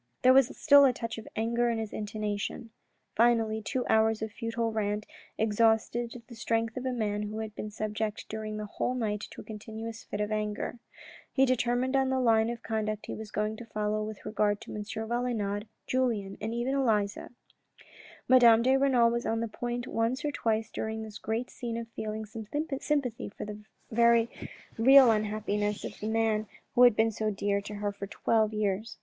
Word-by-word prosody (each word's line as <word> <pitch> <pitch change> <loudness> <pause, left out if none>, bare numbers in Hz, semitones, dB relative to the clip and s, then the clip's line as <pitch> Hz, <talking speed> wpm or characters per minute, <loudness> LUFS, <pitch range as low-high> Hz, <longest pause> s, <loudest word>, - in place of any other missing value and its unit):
There 255 +1 +7
was 265 -1 +4
still 285 -2 +7
a 260 - +4
touch 230 -1 -5
of 220 - -11
anger 235 +2 +1
in 230 - 0
his 220 -2 -4
intonation. 210 +1 -4 0.4
Finally 225 -1 +3
two 250 +4 -2
hours 220 0 +3
of 220 - -4
futile 230 +1 -2
rant 210 -1 -1 0.3
exhausted 225 +2 +1
the 245 - -11
strength 225 0 -1
of 255 0 -3
a - - 0
man 210 -4 -1
who 210 +1 -4
had 220 -1 -5
been 215 - -5
subject 215 0 -3
during 215 -1 -5
the 215 - -4
whole 250 +4 -2
night 210 -4 -1
to - - -10
a - - -12
continuous 220 +2 -7
fit 205 - -6
of 210 0 -1
anger. 215 +2 -2 0.5
He 270 - +4
determined 250 +1 +1
on 265 -1 +3
the 265 0 +1
line 225 -2 +3
of 235 -1 -5
conduct 215 -1 -2
he - - -5
was 220 -1 -7
going 215 +1 -2
to 235 - -9
follow 215 0 -1
with 215 -1 -7
regard 210 -1 +1
to - - -9
M. 210 - -4
Valenod, 220 -1 -2 0.2
Julien 225 -7 0
and 220 +1 -2
even 240 +3 -1
Elisa. 215 -7 0 1.0
Madame 235 -3 +7
de 260 +2 +4
Renal 255 -4 +4
was 235 +1 -2
on 225 - 0
the 230 - -1
point 240 +2 -4
once 235 +4 -1
or 295 - 0
twice 225 -4 -1
during 220 0 -3
this 215 -1 -9
great 225 +3 -3
scene 235 -2 -4
of 230 0 -5
feeling 220 -1 -5
some 215 0 -8 0.3
sympathy 275 -7 -1
for 205 - -7
the 210 0 -7 0.3
very 235 0 +4 0.5
real 265 +1 +8
unhappiness 210 -1 -1
of - - -7
the 215 - -4
man 220 -1 +1 0.3
who 245 - +3
had 245 -3 +8
been 225 +1 +3
so 215 0 -1
dear 200 0 0
to 210 +1 -7
her 205 0 -2
for 200 0 -7
twelve 220 +1 +1
years. 215 +1 -2
220 Hz, 190 wpm, -29 LUFS, 215-235 Hz, 1.0 s, real